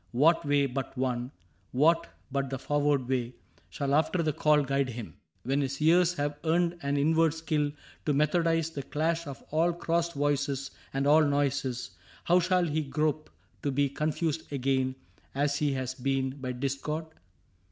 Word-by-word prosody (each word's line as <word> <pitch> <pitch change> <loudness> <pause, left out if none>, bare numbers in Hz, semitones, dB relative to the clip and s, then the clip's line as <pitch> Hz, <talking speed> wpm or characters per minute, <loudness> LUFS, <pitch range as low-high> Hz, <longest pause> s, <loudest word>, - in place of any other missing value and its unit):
What 155 +7 +4
way 145 -1 +3
but 135 0 -4
one, 125 -1 -1 0.4
what 165 +6 +3 0.2
but 140 -1 -1
the 135 - -3
forward 145 -1 +1
way. 125 -2 -1 0.3
Shall 140 +10 -2
after 160 +3 +2
that 155 -2 0
call 150 -2 +4
guide 135 -1 0
him? 115 -9 -7 0.3
When 135 +3 +1
his 140 0 -3
ears 175 +3 +4
Have 145 0 -2
earned 170 +1 +1
an 140 0 0
inward 160 +2 +3
skill 155 -3 0 0.4
to - - +4
methodize 165 +2 +2
The 145 - -4
clash 165 +4 -1
of 140 -1 -8
all 165 +3 +2
crossed 170 0 -1
voices 140 -1 0 0.2
and 135 +1 -1
all 155 +2 +6
noises. 140 -5 0 0.3
How 175 +1 +4
shall 180 0 +2
he 155 -1 0
grope 150 +2 -1 0.3
to 145 - -1
be 140 +1 +1
confused 155 +2 -2
again. 130 -1 0 0.4
As 145 +1 +1
he 145 -2 +1
has 130 -1 -2
been, 135 0 -1
by 130 -2 -5
discord 140 +5 -3
145 Hz, 165 wpm, -29 LUFS, 135-160 Hz, 0.4 s, all